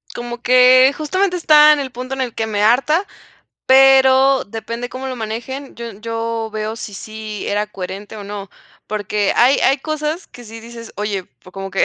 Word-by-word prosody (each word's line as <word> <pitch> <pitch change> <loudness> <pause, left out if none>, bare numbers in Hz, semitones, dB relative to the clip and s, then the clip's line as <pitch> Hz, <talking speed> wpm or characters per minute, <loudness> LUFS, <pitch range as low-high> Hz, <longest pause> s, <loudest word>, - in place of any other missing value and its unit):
como 240 0 -6
que 255 +2 +6
justamente 360 +4 -1
está 300 -2 +6
en 295 - -1
el 265 -2 -4
punto 255 +2 -7
en 265 - -4
el 245 -3 -4
que 220 - -2
me 205 -1 -2
harta, 285 - +2 0.6
pero 265 0 +5
depende 230 +3 -6
de - - -18
cómo 260 +1 -6
lo 255 - -5
manejen. 240 +5 -6
Yo 235 -1 -7
yo 225 +1 -4
veo 215 +1 -4
si 210 -2 -8
sí 215 0 -7
era 205 +1 -1
coherente 200 +2 -8
o 205 - -8
no, 200 -1 -7 0.4
porque 210 -1 -1
hay 255 +4 +4
hay 270 +1 +3
cosas 310 +4 -4
que 245 - -14
si 225 +1 -10
dices: 230 0 -11
"Oye, 205 -3 -3
pues 135 +8 -20
como 195 0 -7
que 195 - +2
235 Hz, 195 wpm, -18 LUFS, 215-265 Hz, 0.6 s, que